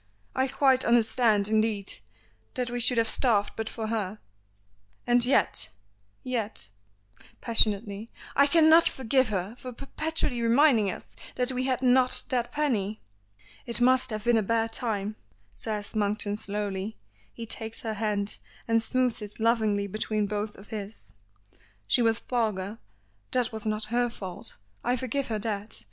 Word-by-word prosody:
I 260 +1 +2
quite 265 -1 +3
understand, 225 -3 +3
indeed, 215 - 0 0.6
that 250 -1 -1
we 245 - -2
should 245 +1 +3
have 230 -1 +3
starved 220 -4 +3
but 220 0 -3
for 225 - -5
her, 215 -2 -2 0.9
and 245 0 +4
yet 255 +3 +3 0.5
yet 220 - 0 0.4
" - - -41 0.3
passionately, 215 -1 +2 0.3
"I 280 +1 +5
cannot 320 +2 +6
forgive 260 -1 +1
her 195 +2 -3
for 255 - -7
perpetually 275 0 -2
reminding 230 -3 +4
us - - -8 0.2
that 250 +1 0
we 255 0 -2
had 260 -1 0
not 255 0 +3
that 245 -2 -1
penny!" 225 -9 -1 0.7
"It 235 - +2
must 255 +1 +4
have 215 -2 -4
been 240 0 +3
a - - +3
bad 225 +2 0
time," 215 -3 -1 0.4
says 210 - -4
Monkton 205 -1 0
slowly. 205 -1 -4 0.3
He 230 - -7
takes 225 0 -4
her 220 -2 -3
hand 210 -1 -1 0.3
and 230 0 +3
smoothes 250 0 0
it 210 +1 -8
lovingly 220 -3 +2
between 215 +1 -1
both 210 +1 -3
of 195 - -14
his. 215 -1 -8 0.7
"She 240 - +3
was 225 -1 +3
vulgar. 215 -4 -2 0.5
That 250 -2 +1
was 220 -1 -6
not 215 0 -1
her 245 0 +2
fault; 190 -6 -7 0.3
I 245 - +1
forgive 260 +2 -2
her 220 - -1
that. 210 0 -4
225 Hz, 150 wpm, -27 LUFS, 210-245 Hz, 0.9 s, cannot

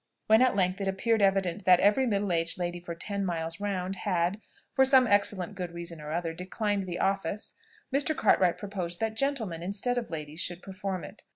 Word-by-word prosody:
When 220 +2 +5
at 255 -4 +4
length 185 0 +1
it 195 - -1
appeared 220 +3 +1
evident 195 -1 +2
that 180 -1 +7
every 210 +6 +4
middle 200 -3 0
aged 165 +2 0
lady 175 -1 -3
for 170 -1 -7
ten 200 +3 -3
miles 165 -2 -3
round 195 -2 -2
had, 180 +1 0 0.3
for 265 - +5
some 265 -1 +6
excellent 205 -3 +2
good 180 -3 -5
reason 170 -2 -6
or 150 0 -6
other, 165 0 -2
declined 195 +3 -2
the 175 -1 -3
office, 195 +2 -1 0.4
Mr. 290 +3 +1
Cartwright 180 -2 +3
proposed 185 -4 -3
that 220 -1 -1
gentlemen, 225 - -1
instead 200 +7 -1
of 235 - -7
ladies, 155 -1 -6
should 175 0 -4
perform 190 -2 -4
it. 205 - -10
195 Hz, 195 wpm, -29 LUFS, 175-210 Hz, 0.4 s, that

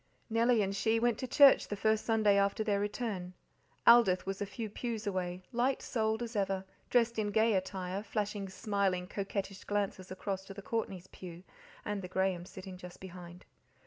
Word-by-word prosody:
Nellie 230 0 +4
and 195 0 -2
she 220 +3 +2
went 240 -1 +1
to 255 - -3
church 280 +2 +7
the 205 - -3
first 220 +1 +1
Sunday 215 -3 +4
after 200 +2 +2
their 205 -2 +1
return. 205 -4 -3 0.5
Aldith 235 -6 +6
was 195 +1 -4
a 205 - -1
few 220 +3 -5
pews 225 +1 -4
away, 185 -2 -2
light 250 +2 +1
souled 220 0 0
as 235 0 -6
ever, 195 -1 0 0.2
dressed 235 -2 +2
in 210 - 0
gay 220 +2 +3
attire, 190 0 -2
flashing 205 -2 -3
smiling, 190 -2 0
coquettish 195 0 -4
glances 200 -2 -2
across 190 0 -4
to 195 - -10
the 200 - -8
Courtneys' 195 -6 -3
pew, 175 -1 -10 0.4
and 205 -1 -2
the 180 - -6
Grahams 185 -1 -1
sitting 190 -1 -9
just 180 -1 -11
behind. 180 -1 -10
200 Hz, 175 wpm, -32 LUFS, 190-220 Hz, 0.5 s, church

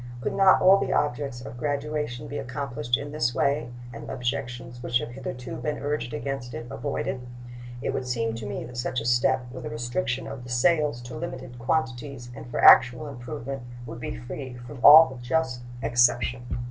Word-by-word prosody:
Could 120 - -2
not 195 -1 +5
all 190 +1 +7
the - - -1
objects 135 -3 -1
of 120 -1 -9
graduation 145 -3 -2
be 145 - -4
accomplished 125 -2 -2
in 145 +1 -6
this 120 -6 0
way, 140 -2 +1 0.2
and 115 - -8
the - - -4
objections 120 -2 -4
which 120 -1 +1
have 120 - -5
hitherto 125 -1 -6
been 150 -1 -2
urged 145 -4 -2
against 120 +1 -4
it 115 - -6
avoided? 135 -2 -3 0.6
It - - 0
would 130 - -3
seem 115 -2 -1
to 115 -2 -6
me 105 - -4
that 120 0 -9
such 125 0 -1
a 115 - -6
step, 120 +1 +2
with 130 -1 -8
a - - -4
restriction 120 +4 -2
of 125 - -7
the 125 - -10
sales 145 0 +2
to 120 - -8
limited 130 -6 -6
quantities 130 -2 -2
and 115 +2 -9
for - - -3
actual 125 +5 +7
improvement, 135 0 -6 0.2
would 115 0 -7
be 60 - -5
free 125 - -7
from 130 +1 -9
all 150 -4 +9
just 125 -1 0 0.2
exception. 120 +1 +2
125 Hz, 185 wpm, -26 LUFS, 120-140 Hz, 0.6 s, all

